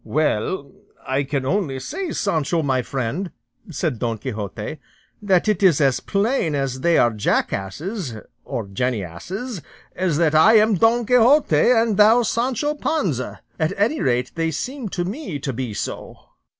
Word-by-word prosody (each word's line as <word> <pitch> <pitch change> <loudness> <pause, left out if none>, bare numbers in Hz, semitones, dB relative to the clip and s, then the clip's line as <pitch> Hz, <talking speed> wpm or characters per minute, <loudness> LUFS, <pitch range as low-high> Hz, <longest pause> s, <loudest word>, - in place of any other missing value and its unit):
"Well, 145 - -1 0.3
I 135 +1 0
can 135 -1 -2
only 145 -5 -1
say, 345 - -4
Sancho, 165 -4 0
my 130 -3 +1
friend," 135 +9 -3 0.4
said 155 -6 -2
Don 115 -2 -1
Quixote, 105 +3 -5 0.4
"that 195 -2 +2
it 210 -3 +1
is 180 -7 +5
as 135 -4 +3
plain 200 - 0
they 135 +4 +1
are 120 -1 +3
jackasses 125 - -2 0.3
or 115 - -4
jennyasses 125 - -4 0.3
as 180 -5 0
that 160 -2 +2
I 160 +8 +6
am 215 0 +5
Don 225 +5 +3
Quixote, 250 - +4
and 225 -4 +3
thou 220 +3 +6
Sancho 250 +6 0
Panza: 190 - -2 0.2
at 160 +3 +1
any 230 +10 +1
rate, 125 0 0
they 165 -1 -1
seem 245 - -4
to 175 -1 -2
me 200 - -5
to 135 -1 -4
be 125 -1 -4
so." 100 - -5
165 Hz, 150 wpm, -21 LUFS, 130-215 Hz, 0.4 s, I